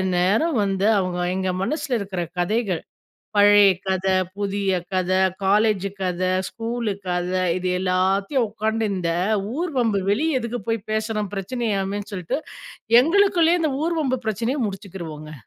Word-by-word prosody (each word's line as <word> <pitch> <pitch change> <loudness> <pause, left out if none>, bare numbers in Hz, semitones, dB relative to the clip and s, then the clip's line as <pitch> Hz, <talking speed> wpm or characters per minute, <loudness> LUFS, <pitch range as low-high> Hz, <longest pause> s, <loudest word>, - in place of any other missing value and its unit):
நேரம் 210 - +2
வந்து 195 0 0
அவங்க 180 -1 -2 0.2
எங்க 190 0 -1
மனசுல 285 +1 -1
இருக்கிற 195 -3 -4 0.2
கதைகள் 195 -1 0 0.6
பழைய 205 -1 +7
கத, 190 -1 -1 0.3
புதிய 200 -1 -1 0.2
கத, 185 -1 0 0.3
காலேஜ் 205 0 +2
கத, 180 -1 -2 0.3
ஸ்கூலு 230 -1 -3 0.2
கத 180 0 -1 0.3
இது 185 0 -2
எல்லாத்தையும் 190 +7 +1
உக்காந்து 220 +1 -1
இந்த 175 -3 -1 0.5
ஊர் 345 0 -1
வம்பு 225 -5 +2
வெளிய 280 +7 +1
எதுக்கு 235 +1 -4
போய் 225 -2 -2
பேசணும் 215 -2 -2
பிரச்சனையாமேன்னு 200 -1 -2
சொல்லிட்டு, 180 - -2 0.6
எங்களுக்குள்ளேயே 350 0 +3
இந்த 310 -3 +1
ஊர் 335 0 0
வம்பு 260 -2 0
பிரச்சனைய 230 +7 -1
முடிச்சுக்குருவோங்க. 170 -6 -8
205 Hz, 130 wpm, -23 LUFS, 190-235 Hz, 0.6 s, பழைய